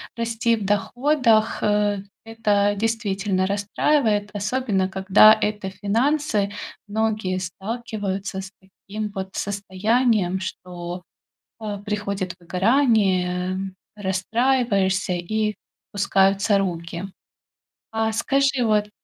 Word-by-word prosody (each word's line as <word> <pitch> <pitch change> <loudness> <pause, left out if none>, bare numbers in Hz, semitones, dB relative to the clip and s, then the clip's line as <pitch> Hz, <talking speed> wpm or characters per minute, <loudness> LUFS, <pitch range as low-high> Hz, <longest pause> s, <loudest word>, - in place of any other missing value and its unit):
расти 230 0 0
в 215 -3 -5
доходах, 230 +2 +2
а. 210 -1 +2 0.3
Это 210 -3 +1
действительно 205 -3 0
расстраивает, 205 +2 +1
особенно 205 -2 0
когда 190 +3 +6
это 210 -2 -2
финансы. 220 +1 0 0.4
Многие 215 -3 -1
сталкиваются 195 0 -4
с 190 0 -7
таким 205 +2 -7
вот 190 -1 -5
состоянием, 200 0 +1
что, 180 -1 -6 0.6
а, 210 -2 -4
приходит 200 -3 -3
выгорание, 185 -3 +2 0.4
расстраиваешься 200 -1 +1
и 210 +5 -1 0.4
пускаются 200 +1 +3
руки. 170 -2 -3 0.9
А 220 0 0
скажи, 275 +3 +1
вот 210 -1 +2
205 Hz, 90 wpm, -23 LUFS, 190-225 Hz, 0.9 s, когда